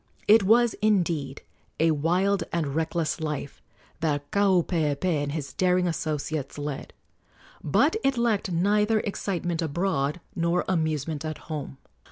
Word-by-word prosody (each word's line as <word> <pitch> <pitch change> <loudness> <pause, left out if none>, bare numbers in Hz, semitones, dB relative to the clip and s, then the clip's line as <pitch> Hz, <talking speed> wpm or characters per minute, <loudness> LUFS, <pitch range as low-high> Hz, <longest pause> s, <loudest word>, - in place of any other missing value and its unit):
It 220 +1 +7
was 230 +4 +4
indeed 170 -10 0 0.4
a 165 +1 +4
wild 180 +6 +1
and 155 -5 -1
reckless 160 +1 -1
life 150 -3 -4 0.4
that 145 -3 -1
Kaupeepee 175 -5 +2
and 145 0 -2
his 140 -4 -5
daring 180 0 +2
associates 155 -4 -3
led; 145 -1 -5 0.7
but - - +3
it 270 -2 +2
lacked 225 -5 +1
neither 210 +5 +2
excitement 175 -4 -2
abroad 160 -1 -1 0.2
nor 170 +1 +1
amusement 155 -3 -1
at 155 -1 -4
home. 150 -4 -6
165 Hz, 125 wpm, -26 LUFS, 150-190 Hz, 0.7 s, It